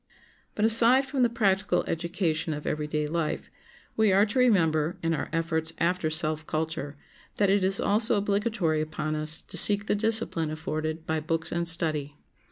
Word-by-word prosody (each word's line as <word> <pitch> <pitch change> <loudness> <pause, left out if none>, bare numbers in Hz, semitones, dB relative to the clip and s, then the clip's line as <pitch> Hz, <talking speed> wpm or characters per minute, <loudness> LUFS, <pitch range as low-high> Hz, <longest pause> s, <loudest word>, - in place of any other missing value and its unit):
But 210 - +1
aside 235 +4 +4
from 270 -1 -2
the 240 - +4
practical 205 -4 0
education 165 -2 -2
of 150 - -8
everyday 150 0 -2
life 160 +1 -3 0.4
we 220 -2 +3
are 195 +2 +4
to 225 +4 -2
remember, 165 -9 +2
in 165 0 0
our - - -3
efforts 165 -1 -2
after 170 -1 0
self 155 0 -1
culture, 155 -2 -4 0.4
that 200 -2 +2
it 200 -1 +2
is 190 +1 +2
also 215 +3 +2
obligatory 200 -5 0
upon 155 0 -4
us 155 0 -2
to - - -4
seek 205 0 +6
the - - 0
discipline 215 -6 0
afforded 155 +1 -4
by 160 0 -1
books 165 +1 -2
and 170 0 -2
study. 155 -4 +1
165 Hz, 170 wpm, -26 LUFS, 155-205 Hz, 0.4 s, seek